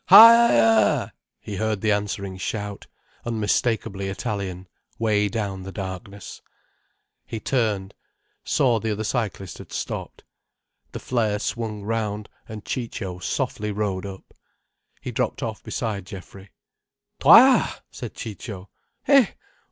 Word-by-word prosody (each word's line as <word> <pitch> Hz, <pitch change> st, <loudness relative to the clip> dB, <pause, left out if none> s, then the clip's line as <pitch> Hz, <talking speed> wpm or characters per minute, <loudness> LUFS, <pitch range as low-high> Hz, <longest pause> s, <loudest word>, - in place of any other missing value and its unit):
"Ha 230 Hz, +1 st, +10 dB
er -, -, +3 dB
er!" 115 Hz, -1 st, +4 dB, 0.3 s
he 100 Hz, -2 st, -6 dB
heard 110 Hz, -1 st, -1 dB
the 110 Hz, -, +2 dB
answering 100 Hz, -2 st, -2 dB
shout, 100 Hz, +1 st, -5 dB, 0.4 s
unmistakably 110 Hz, -2 st, -1 dB
Italian, 95 Hz, -3 st, -4 dB, 0.3 s
way 105 Hz, -2 st, +2 dB
down 100 Hz, -4 st, -3 dB
the 95 Hz, +1 st, -7 dB
darkness. 95 Hz, +1 st, -7 dB, 0.8 s
He 115 Hz, -, -6 dB
turned—saw 110 Hz, +1 st, -1 dB
the 110 Hz, -1 st, -1 dB
other 105 Hz, +1 st, -3 dB
cyclist 105 Hz, -5 st, -3 dB
had -, -, -11 dB
stopped. -, -, -5 dB, 0.7 s
The -, -, -6 dB
flare 110 Hz, -4 st, 0 dB
swung 105 Hz, -1 st, -4 dB
round, 105 Hz, -1 st, -2 dB, 0.2 s
and 110 Hz, -1 st, -8 dB
Ciccio 95 Hz, -7 st, -4 dB
softly 105 Hz, +2 st, -2 dB
rode 100 Hz, -2 st, -2 dB
up. 95 Hz, -1 st, -11 dB, 0.7 s
He -, -, -5 dB
dropped -, -, -2 dB
off -, -, -4 dB
beside 100 Hz, -4 st, -4 dB
Geoffrey. 95 Hz, +1 st, -11 dB, 0.7 s
"Toi!" -, -, +8 dB, 0.3 s
said -, -, -8 dB
Ciccio. 100 Hz, -3 st, -8 dB
105 Hz, 115 wpm, -24 LUFS, 100-115 Hz, 0.8 s, Ha